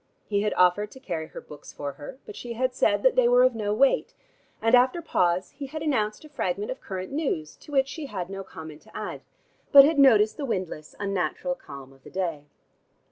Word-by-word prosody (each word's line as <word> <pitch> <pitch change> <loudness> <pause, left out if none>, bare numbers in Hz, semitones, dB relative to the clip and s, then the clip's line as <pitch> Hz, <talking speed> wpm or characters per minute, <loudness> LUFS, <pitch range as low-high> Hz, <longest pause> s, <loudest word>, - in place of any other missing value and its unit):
He 200 -1 0
had 210 0 -1
offered 180 +3 +3
to 265 - -12
carry 170 -10 -4
her - - -9
books 150 - -12
for 145 -1 -5
her, 145 - -10
but 425 - -9
she 240 -1 -6
had 255 +2 -1
said 205 -5 +2
that 260 - +4
they 255 -2 +5
were 245 +1 +5
of 255 0 +4
no 210 -2 -2
weight, 265 +6 +2 0.4
and 225 +2 +1
after 255 +6 +5
pause 180 - 0
he 280 -1 -7
had 310 +3 -6
announced 215 -5 -1
a - - -13
fragment 205 -7 -2
of 260 - -7
current 185 +2 -6
news 270 - -2
to - - -15
which 270 -2 +3
she 295 0 -6
had 185 -7 -4
no 195 0 -6
comment 160 -4 -10
to - - -12
add, - - -5 0.5
but 275 -1 +10
had 300 0 +2
noticed 220 -5 +5
the 290 - -3
windless, 185 - -4
unnatural 200 +7 -1
calm 140 - -11
of 135 -1 -23
the - - -12
day. 170 -6 -3
210 Hz, 220 wpm, -26 LUFS, 180-265 Hz, 0.5 s, but